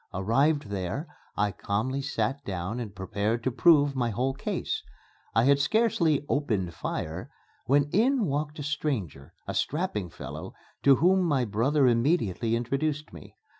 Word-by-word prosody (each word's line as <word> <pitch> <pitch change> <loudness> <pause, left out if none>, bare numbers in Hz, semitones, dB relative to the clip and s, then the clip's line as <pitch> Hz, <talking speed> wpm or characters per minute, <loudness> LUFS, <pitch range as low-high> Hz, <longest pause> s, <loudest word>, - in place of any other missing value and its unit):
Arrived 135 +7 +2
there, 100 - -3 0.3
I 105 0 +2
calmly 125 +9 -2
sat 140 0 -2
down 95 +4 -4
and 105 -4 -6
prepared 105 +4 -2
to 130 - 0
prove 145 0 +4
my 120 -2 0
whole 125 +5 -1
case. 135 - -3 0.5
I 115 - +5
had 140 +2 +4
scarcely 165 -4 +2
"opened 105 - -1
fire" 80 +2 -4 0.4
when 140 +2 +4
in 245 +3 +3
walked 150 0 -2
a 145 - -5
stranger 130 - -3
a - - -3
strapping 145 - -1
fellow, - - -8 0.3
to 140 -1 +6
whom 185 +6 +4
my 145 -8 +1
brother 130 +7 +2
immediately 115 - +2
introduced 140 - -2
me. 80 -4 -12
135 Hz, 145 wpm, -27 LUFS, 105-150 Hz, 0.5 s, to